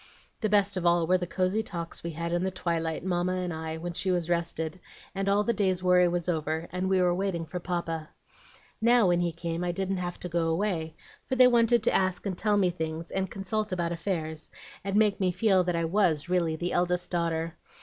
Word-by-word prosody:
"The 215 - 0
best 200 -1 +2
of 180 - -2
all 170 -1 +4
were 185 +2 +3
the 175 - -3
cosey 185 +4 0
talks 170 -6 -6
we 170 - -3
had 170 +1 -3
in 175 +1 +1
the 190 - +1
twilight, 170 -3 -2
Mamma 180 0 0
and 180 -2 -2
I, 160 0 -4
when 175 +1 -5
she 190 - -1
was 175 -2 0
rested, 170 0 -2 0.3
and 195 +1 -1
all 205 +1 +3
the 235 - +1
day's 190 -3 0
worry 180 -1 +5
was 175 0 -2
over, 160 -1 -1
and 185 +2 -1
we 190 -1 +3
were 180 -1 +3
waiting 180 -3 -1
for 180 +3 -5
Papa. 170 -3 -3 0.7
Now, 235 -3 +5
when 175 0 +3
he 175 -1 0
came, 170 +1 -4
I 175 - 0
didn't 190 +2 -2
have 175 -1 -4
to - - -4
go 170 -1 0
away, 165 -2 -1 0.3
for 260 - -1
they 255 0 +8
wanted 235 -2 +4
to - - +2
ask 185 0 +1
and 195 -2 -2
tell 210 +3 +1
me 185 -3 +3
things, 160 -1 -5
and 190 -1 -1
consult 210 +2 -3
about 170 -2 -1
affairs, 165 -3 -3 0.3
and 195 +1 -2
make 210 -1 +3
me 190 -2 +2
feel 190 0 +3
that 175 -1 0
I 165 0 0
was 165 -4 +1
really 175 -3 +1
the 175 +2 -3
eldest 180 0 0
daughter. 165 -1 -1
180 Hz, 225 wpm, -28 LUFS, 170-190 Hz, 0.7 s, they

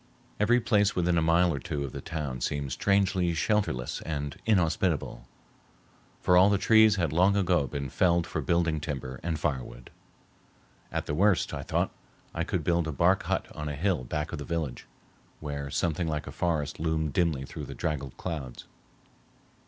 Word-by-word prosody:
Every 120 +4 +4
place 105 -4 +2
within 90 -1 +2
a 85 - +3
mile 85 +2 +3
or 70 - -3
two 70 +2 -3
of 70 - -5
the - - -6
town 70 -6 -4
seemed 70 +1 -2
strangely 95 +1 +2
shelterless 85 - 0
and 75 -2 -4
inhospitable, 85 - +1 0.9
for 90 - +4
all 95 +3 +7
the 100 - +3
trees 110 +1 +5
had 85 -6 0
long 95 +4 +4
ago 90 -7 +2
been 70 +2 -4
felled 85 +4 +2
for 80 - -3
building 80 +2 +1
timber 65 -4 -5
and 85 -1 -2
firewood. 65 -5 -4 1.0
At - - -2
the - - -3
worst, 95 +2 +2
I - - -3
thought, - - -1 0.4
I - - -1
could - - -2
build 85 -2 +1
a - - -1
bark 70 - +3
hut - - 0
on 75 0 -4
a 75 - -3
hill 85 -2 0
back 75 +5 -3
of - - -5
the - - -4
village, 80 -6 -4 0.5
where 70 -2 -5
something 85 +3 -1
like 75 -1 -2
a - - -7
forest 80 -4 -1
loomed 80 -2 -1
dimly 80 -6 +1
through - - -7
the - - -8
draggled 70 -4 -3
clouds. 75 -9 -5
80 Hz, 175 wpm, -28 LUFS, 70-90 Hz, 1.0 s, all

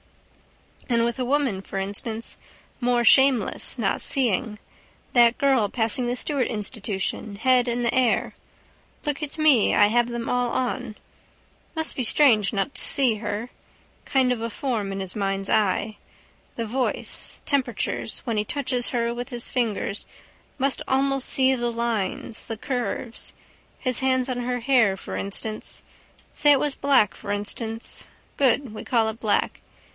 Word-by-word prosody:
And 235 -1 +2
with 235 +1 -2
a 250 - 0
woman, 260 -7 0
for 195 - -7
instance. 205 +4 -3 0.5
More 240 0 +2
shameless 265 -2 +4
not 210 -5 0
seeing. 230 -4 +1 0.6
That 240 -1 +5
girl 265 -7 +2
passing 235 +2 -1
the 245 - -1
Stewart 275 0 0
institution, 210 -2 -4
head 250 +3 +3
in 240 0 -1
the 235 - +1
air. 250 -3 +1 0.7
Look 295 0 -2
at 300 +1 -6
me. 300 -8 +4
I 205 - +6
have 240 +2 +2
them 235 -1 -4
all 245 -1 +1
on. 250 -3 -2 0.8
Must 320 0 -1
be 255 - -1
strange 225 -5 +4
not 215 +7 -2
to - - +4
see 255 -5 +3
her. 210 +3 -4 0.5
Kind 260 -2 +2
of 230 - -6
a 230 - -2
form 225 -4 -2
in 195 - -4
his 190 -1 -4
mind's 195 -1 -2
eye. 215 0 +1 0.6
The 230 - -3
voice, 250 +4 -1
temperatures: 280 -3 -1
when 230 -4 -1
he 210 - +1
touches 250 0 -1
her 235 -1 -1
with 245 +2 -6
his 240 -2 -2
fingers 220 -4 -2 0.5
must 275 0 0
almost 270 0 +1
see 265 0 +4
the 240 -2 -1
lines, 230 -2 -3
the 225 - -4
curves. 245 -1 -2 0.5
His 255 -3 +1
hands 260 -1 +1
on 255 -2 -2
her 245 0 -2
hair, 230 -6 +3
for - - -7
instance. 215 +2 -2 0.5
Say 295 -1 +4
it 280 - +5
was 290 -1 -1
black, 270 -7 +3
for 205 - -7
instance. 220 +2 -5 0.3
Good. 265 -3 +2
We 215 - -7
call 230 -3 +2
it 220 +1 -4
black. 215 -3 0
240 Hz, 155 wpm, -24 LUFS, 215-260 Hz, 0.8 s, I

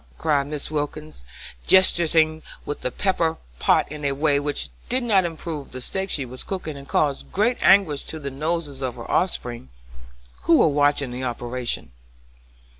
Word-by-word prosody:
cried 145 -3 +1
Mrs. 150 0 -4
Wilkins, 150 - -4 0.4
gesticulating 160 -4 +4 0.2
with 145 - -4
the - - -1
pepper 165 +1 0 0.2
pot - - +3
in 150 -1 -7
a 140 -1 +1
way 145 0 +2
which 145 0 -2 0.2
did 255 +1 +2
not 200 -6 +3
improve 160 -3 -5
the 130 - -6
steak 190 +9 -3
she 140 -6 -1
was 130 +1 -7
cooking, 180 -6 -5
and 140 0 -10
caused 145 -2 0
great 225 +5 +1
anguish 190 -8 +5
to 160 - -7
the 140 -3 -5
noses 150 -1 -2
of 130 -2 -2
her 115 - -8
offspring, 120 - -1 0.8
who 165 - +6
were - - +5
watching 145 -2 +2
the 125 +1 -5
operation. 120 - -3
150 Hz, 165 wpm, -23 LUFS, 140-165 Hz, 0.8 s, who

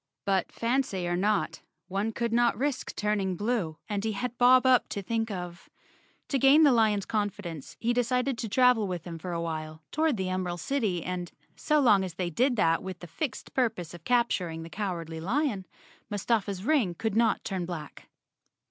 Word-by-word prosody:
But 195 -3 +1
fancy 230 -7 -1
or 175 - 0
not, 205 +3 0 0.3
one 200 +4 -1
could 235 0 -2
not 240 0 +3
risk 275 0 -2
turning 205 -3 0
blue, 205 -6 -1
and 205 -1 -2
he 220 -1 -1
had 245 +4 -3
Bob 255 +1 +6
Up 255 -1 +4
to 200 - -4
think 225 +2 -1
of. 180 -2 -7 0.6
To 275 - +1
gain 275 +5 +7
the 290 - +7
lion's 215 -4 +3
confidence 205 -8 -4
he 235 +1 +1
decided 250 +2 +1
to 225 - -3
travel 245 -2 +4
with 180 -3 -4
him 165 -2 -6
for 180 +2 -5
a 170 - -2
while 155 -1 -5
toward 310 -5 +1
the 190 -1 -2
Emerald 180 -1 -2
City 210 - -1
and, 180 -1 -4 0.2
so 305 -1 +2
long 210 -8 +5
as 180 -3 -5
they 175 -1 -2
did 250 - +2
that 165 -6 +2
with 190 -1 -6
the 175 - -10
fixed 260 - -5
purpose 220 - -1
of 170 -2 -11
capturing 185 -9 0
the 165 - -10
Cowardly 170 -6 -4
Lion, 210 - -1 0.4
Mustafa's 205 -2 -1
ring 235 - +2
could 220 +2 -2
not 230 0 +2
turn 185 -3 -3
black. 160 -5 -8
205 Hz, 185 wpm, -28 LUFS, 180-240 Hz, 0.6 s, gain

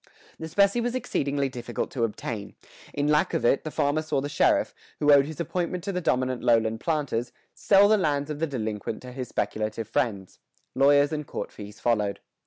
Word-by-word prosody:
The 160 - -5
specie 200 +7 +3
was 240 +1 -2
exceedingly 140 - -1
difficult 120 -2 -5
to 120 - -2
obtain; 110 -1 -4 0.4
in 145 0 -1
lack 150 0 +2
of - - 0
it, 135 - +3
the 155 - -4
farmer 145 +1 0
saw 155 -3 -1
the 145 +2 -3
sheriff, - - +2 0.2
who 150 0 +3
owed 140 0 +5
his 155 -1 -8
appointment 175 +1 -2
to 200 - -2
the 180 -1 -2
dominant 130 -4 0
lowland 115 -2 +2
planters, 140 -7 -1 0.2
sell 200 0 +5
the 215 +1 +4
lands 145 -5 0
of 150 - -5
the 165 - 0
delinquent 110 -5 -4
to 125 - -8
his 125 0 -5
speculative 110 0 -2
friends. 110 -7 -2 0.3
Lawyers 145 +2 +4
and 150 -1 -4
court - - -5
fees 105 0 -10
followed. 105 -4 0
140 Hz, 195 wpm, -26 LUFS, 115-155 Hz, 0.4 s, owed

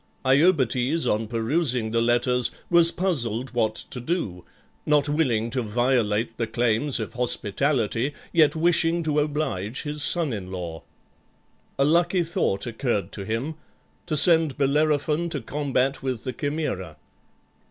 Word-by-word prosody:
Iobates, 140 0 +2
on 110 +1 0
perusing 120 0 -1
the 115 0 +1
letters, 120 +1 +2 0.2
was 170 -1 +7
puzzled 130 - -1
what 110 -3 0
to 125 - -7
do, 120 - -3 0.4
not 150 -1 +2
willing 125 -7 0
to 125 - -1
violate 115 -1 0
the 115 - -2
claims 120 +4 0
of 110 - -5
hospitality, 125 +1 -1 0.2
yet 160 -2 +4
wishing 170 +1 +2
to 150 -1 0
oblige 145 -8 -2
his 150 -1 -4
son 160 -4 +2
in 95 -3 -6
law. 85 -3 -6 1.0
A 135 - +3
lucky 175 +3 +2
thought 115 -11 -1
occurred 110 -5 -2
to 100 - -6
him, 115 +9 -3 0.5
to 155 -3 +1
send 160 -3 +6
Bellerophon 150 +3 +1
to - - -3
combat 140 -2 -1
with 130 -4 -4
the 130 - -4
Chimaera. 120 - -4
130 Hz, 135 wpm, -24 LUFS, 115-155 Hz, 1.0 s, was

